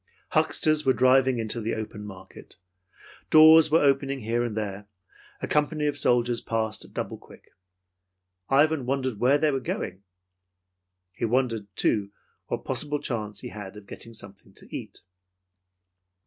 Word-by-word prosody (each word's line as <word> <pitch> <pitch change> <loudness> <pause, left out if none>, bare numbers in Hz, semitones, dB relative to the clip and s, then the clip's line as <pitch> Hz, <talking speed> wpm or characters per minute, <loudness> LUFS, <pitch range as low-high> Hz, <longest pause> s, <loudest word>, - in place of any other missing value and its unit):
Hucksters 155 -1 +2
were 135 -2 +3
driving 130 0 +4
into 115 +1 -2
the 110 +1 -2
open 105 -1 -6
market. 95 -3 -12 0.7
Doors 160 0 +8
were 160 +1 +4
opening 135 -1 +1
here 115 +2 -1
and 115 -3 -4
there. 100 -1 -4 0.6
A - - -1
company 150 0 0
of 145 -1 0
soldiers 120 -3 +2
passed 110 -1 -2
at - - -16
double - - -4
quick. - - -18 1.0
Ivan 145 -1 +3
wondered 130 -4 -1
where 130 +5 +4
they 150 0 +2
were 135 - -1
going. 95 -6 -4 1.1
He 115 - -3
wondered, 115 -3 0
too, 100 -1 +1 0.4
what - - -4
possible 150 0 -1
chance 105 -6 -4
he - - -7
had 105 -2 -9
to 105 - -10
get 100 - -11
something 100 -2 -12
to - - -11
eat. - - -8
120 Hz, 150 wpm, -26 LUFS, 110-140 Hz, 1.1 s, Doors